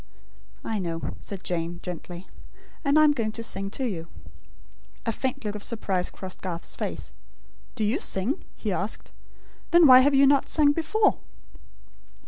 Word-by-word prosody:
"I 220 -2 -2
know," 165 -3 -3
said 195 -2 -7
Jane, 170 0 -2
gently; 175 0 -7 0.6
"and 280 0 +3
I 310 - +7
am 300 - +6
going 230 -6 -1
to 230 - -4
sing 195 -3 -2
to 260 +6 -3
you." 170 -6 -5 1.0
A 230 - +1
faint 250 0 -3
look 205 - -2
of 210 - -6
surprise 195 -6 -1
crossed 185 -1 -9
Garth's 175 -2 -5
face. - - -5 0.6
"Do 220 - -2
you 220 +10 +1
sing?" 215 - -1
he - - -3
asked. - - -4 0.6
"Then 345 -1 +7
why 255 -3 +10
have 275 +2 +4
you 275 +1 +6
not 280 0 +3
sung 295 -2 +4
before?" 335 +8 +1
220 Hz, 160 wpm, -26 LUFS, 185-280 Hz, 1.0 s, why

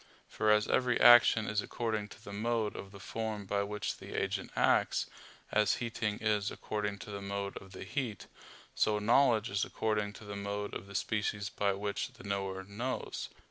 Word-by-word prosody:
For 110 - 0
as 105 0 +5
every 125 -1 +2
action 120 -2 +8
is 105 -1 +1
according 110 -3 -2
to - - -14
the 100 - -8
mode 110 0 0
of 95 - -7
the 100 - -11
form 110 0 -4
by 100 +1 0
which 105 +1 -3
the - - -9
agent - - -2
acts, - - +3 0.5
as 105 -1 +3
heating 110 -3 -2
is 105 -2 +1
according 105 -1 -3
to - - -8
the 100 -1 -5
mode 100 0 -3
of 95 - -11
the 95 - -7
heat; 125 -7 -3 0.5
so 105 -1 +2
knowledge 115 +1 +4
is 100 0 +1
according 105 -2 -1
to 110 - -12
the 105 0 -6
mode 100 0 -3
of 100 - -6
the 100 - -10
species 105 -1 -1
by 100 -1 +1
which 100 +5 -3
the 125 - -14
knower 95 -2 -2
knows. 115 +7 -4
105 Hz, 185 wpm, -32 LUFS, 100-110 Hz, 0.5 s, action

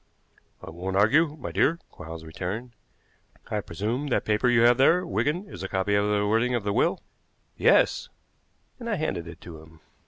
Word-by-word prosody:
"I - - -8
won't 90 +3 -5
argue, 145 +9 +3
my 85 - -5
dear," 120 - +2
Quarles 80 +1 -9
returned. 95 +9 -5 0.8
"I 105 - 0
presume 110 - -3
that 130 - 0
paper 110 +4 +2
you 120 -1 +4
have 120 +1 +5
there, 170 +7 +4
Wigan, 170 +2 -1
is - - -10
a 95 - -3
copy 95 +2 -1
of 100 0 +2
the 105 0 +1
wording 115 +4 +1
of 120 - -2
the 100 0 -1
will?" - - +1 0.5
"Yes," - - +3 0.7
and 235 -1 -6
I 210 - +1
handed 95 - -3
it 85 - -10
to 80 -3 -10
him. 80 0 -18
105 Hz, 185 wpm, -26 LUFS, 95-130 Hz, 0.8 s, have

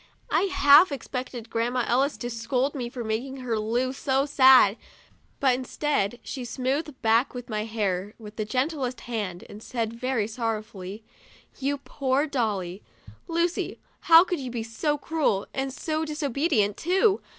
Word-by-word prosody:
I 395 - +2
half 315 -2 +7
expected 250 -3 -5
Grandma 240 +2 0
Ellis 270 +4 +1
to 240 - -4
scold 245 +4 -1
me 250 -5 -4
for 240 -1 -6
making 235 +5 -3
her 235 -3 -1
Lu 240 +4 0
so 270 0 0
sad, 260 -7 +6 0.6
but 265 -2 +4
instead 250 -3 -1
she 260 - -5
smoothed 265 +4 -2
back 230 +3 +3
my 215 -2 -2
hair 205 -3 -2
with 215 -2 -11
the 215 - -2
gentlest 255 +2 -2
hand, 205 -7 -4
and 210 - -11
said, 230 -1 -3
very 235 -2 -1
sorrowfully: 215 -3 -4 0.6
"Your 280 +1 0
poor 275 0 -1
dolly! 210 - -2 0.5
Lucy, 335 0 -1 0.3
how 330 +1 +10
could 355 -3 -3
you 260 -2 -5
be 235 -2 -3
so 295 +7 -1
cruel, 290 -10 0
and 270 0 -2
so 310 +3 -2
disobedient, 285 - 0
too 385 +4 +2
255 Hz, 150 wpm, -26 LUFS, 225-285 Hz, 0.6 s, how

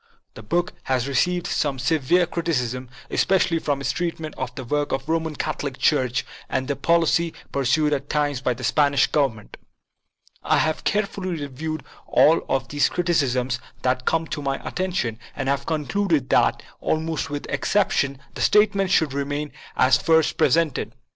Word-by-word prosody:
The - - -10
book 175 +11 -1
has 130 -1 0
received 175 +6 +1
some 140 -3 0
severe 155 +6 +2
criticism, 130 -8 -2 0.2
especially 180 -3 +2
for 145 -3 -1
its 140 - -1
treatment 165 -3 -3
of 125 -1 -5
the 135 - -5
work 145 +4 -1
of 135 0 -2
the 160 - -3
Roman 160 -2 -1
Catholic 145 -3 -3
Church 130 -4 +1 0.2
and 130 0 -1
the 140 - -1
policy 170 +2 +2 0.2
pur 140 - -1
sued 150 +4 +3
at 140 0 -3
times 145 -3 0
by 125 -2 0
the 125 - -9
Spanish 140 +2 +3
Government. 130 -8 -1 0.8
I - - +2
have 155 0 0
care 210 0 +2
fully 185 -4 -5
reviewed 145 +2 -5 0.2
all 160 +2 +5
of 130 -2 0
these 145 +1 +2
criticisms 130 -8 0 0.2
that 130 0 0
came 165 0 +2
to 150 - -3
my 135 -1 -2
attention 180 - -2 0.2
and 135 - -3
have 140 0 0
concluded 160 -1 0
that, - - +3 0.2
almost 160 0 -1
without 145 0 -5
excep 205 -2 +1
tion, 140 -1 0 0.2
the - - -6
statements 200 -2 +3
should 160 -7 +3
remain 145 +1 -3 0.3
as 130 -1 +5
first 160 -1 +3
presented. 165 -4 +1
145 Hz, 165 wpm, -23 LUFS, 130-165 Hz, 0.8 s, all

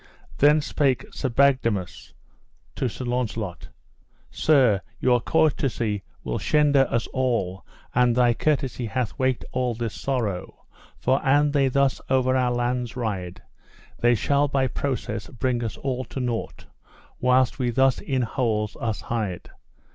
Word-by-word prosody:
Then 150 +2 +5
spake 140 -3 0
King 130 - -3
Bagdemagus 115 - +1 0.6
to 130 - -1
Sir 125 - -7
Launcelot: 115 -7 -3 0.6
Sir, 130 -10 +3 0.2
your 125 -2 +3
courtesy 120 -10 +1 0.2
will - - -2
shende 145 -3 +3
us 115 0 0
all, 115 -8 -1 0.3
and 125 -1 +3
thy 120 -1 +4
courtesy 130 -3 -1
hath 115 +1 -3
waked 130 -2 0
all 125 -2 -1
this 115 -1 -3
sorrow; 115 -9 -3 0.3
for 130 +1 +1
an 145 +1 +3
they 140 -2 +3
thus 135 +1 +1
over 130 0 +2
our 125 -1 +2
lands 120 0 -1
ride, 100 -7 -4 0.6
they 120 0 +4
shall 140 +6 +2
by 135 -1 +1
process 125 -5 -3
bring 125 -1 -2
us 110 - -4
all 130 -1 -2
to 135 - -7
nought 120 -3 -3 0.5
whilst 125 0 +2
we 125 -2 +1
thus 130 +2 +3
in 130 -2 -1
holes 110 -3 -1
us 110 -3 -3
hide. 105 -7 -4
125 Hz, 140 wpm, -24 LUFS, 115-135 Hz, 0.6 s, Then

